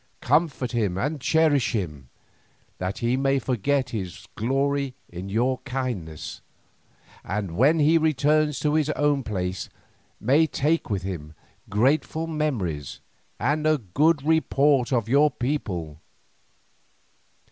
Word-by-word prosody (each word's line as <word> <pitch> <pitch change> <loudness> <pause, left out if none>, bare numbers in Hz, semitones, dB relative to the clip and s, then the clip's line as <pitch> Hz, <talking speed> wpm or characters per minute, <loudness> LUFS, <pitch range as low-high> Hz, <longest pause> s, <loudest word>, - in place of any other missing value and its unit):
Comfort 145 -6 +1
him 105 -7 0
and 145 +6 -2
cherish 145 -6 +2
him, 75 - -4 0.7
that 95 +3 -3
he 120 +2 +2
may 135 +1 +2
forget 130 +1 0
his 95 -5 -6
glory 135 +3 0
in 90 +3 -7
your 125 +5 +1
kindness, 120 - -5 0.8
and 100 -4 -3
when 145 - +4
he 160 +2 +4
returns 155 -1 +2
to 150 -1 +1
his 155 -1 +2
own 145 -1 +2
place 95 -5 -3 0.5
may 145 +8 +3
take 155 +2 0
with 100 -3 -1
him 80 -5 -6 0.3
grateful 140 +9 +1
memories 120 - -2 0.4
and 150 +6 +1
a 155 0 +4
good 140 - +1
report 145 -4 +2
of 115 -4 +1
your 145 +5 +4
people. 95 - -3
130 Hz, 120 wpm, -25 LUFS, 100-150 Hz, 0.8 s, when